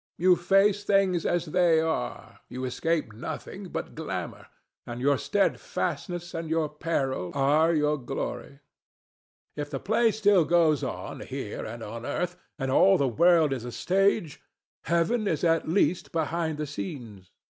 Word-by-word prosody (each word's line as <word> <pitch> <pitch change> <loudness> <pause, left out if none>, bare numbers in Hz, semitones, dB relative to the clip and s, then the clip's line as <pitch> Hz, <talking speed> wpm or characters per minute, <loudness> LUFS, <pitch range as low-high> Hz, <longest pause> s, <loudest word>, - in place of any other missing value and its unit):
You 180 +1 +5
face 195 +4 +3
things 195 -4 +2
as 175 -1 0
they 170 0 +3
are; 160 - -3
you 130 +1 -5
escape 155 -1 -1
nothing 110 - -7
but - - -5
glamor; - - -5 0.4
and 120 0 -6
your 140 +3 +3
steadfastness 175 +1 -2
and 165 -1 -4
your 160 -1 0
peril 140 - -2
are 150 +4 +3
your 150 -1 +1
glory. 135 +2 -5 0.9
If 145 -1 -4
the - - -4
play 225 +2 +2
still 205 -4 +3
goes 155 -2 +3
on - - -5
here - - -6
and 115 +1 -7
on 115 +2 -7
earth, 175 +6 -2 0.2
and 135 -3 -2
all 190 +7 +5
the 140 - +1
world 160 +3 +4
is 125 -4 -5
a 120 - -6
stage, 180 - +1 0.4
Heaven 170 - +1
is 160 -6 -1
at 165 -2 +2
least 175 -1 +1
behind 160 -1 -1
the 150 - -2
scenes. 120 - -7
160 Hz, 150 wpm, -27 LUFS, 140-175 Hz, 0.9 s, You